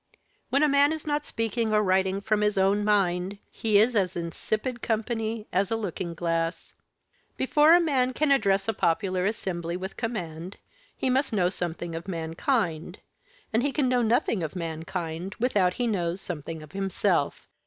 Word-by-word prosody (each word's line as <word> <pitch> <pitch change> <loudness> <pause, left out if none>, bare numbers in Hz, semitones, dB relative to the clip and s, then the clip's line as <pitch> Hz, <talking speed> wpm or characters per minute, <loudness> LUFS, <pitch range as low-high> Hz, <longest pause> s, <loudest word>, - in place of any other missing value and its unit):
When 275 +3 +3
a - - +6
man 285 +1 +4
is 315 - -6
not 295 0 -1
speaking 225 0 -1
or 210 0 +3
writing 190 0 +1
from 215 0 +1
his 210 -1 +1
own 195 +2 +3
mind, 195 -2 +1
he 215 -2 +2
is 225 +4 +4
as 190 -4 +1
insipid 215 +8 -3
company 225 -1 -2
as 190 +1 +2
a 225 - 0
looking 180 -5 -4
glass. 165 0 -2 0.6
Before 300 +5 +5
a - - +6
man 270 -7 +2
can 300 +2 +1
address 200 -7 +3
a 225 - +1
popular 185 +1 +1
assembly 175 -5 -3
with 190 +1 -7
command, 180 -6 -4 0.4
he 260 - 0
must 265 -1 +1
know 180 -4 +3
something 175 -2 -4
of 165 +3 -6
mankind, 170 - -1 0.6
and 225 - +3
he 285 +2 0
can 275 -2 +1
know 250 -1 +2
nothing 230 -3 +1
of 160 +2 -4
mankind 165 +2 -4
without 200 -7 +2
he 245 - -1
knows 180 -5 -1
something 160 -3 -6
of 150 - -13
himself. 195 -4 0
200 Hz, 170 wpm, -27 LUFS, 175-230 Hz, 0.6 s, a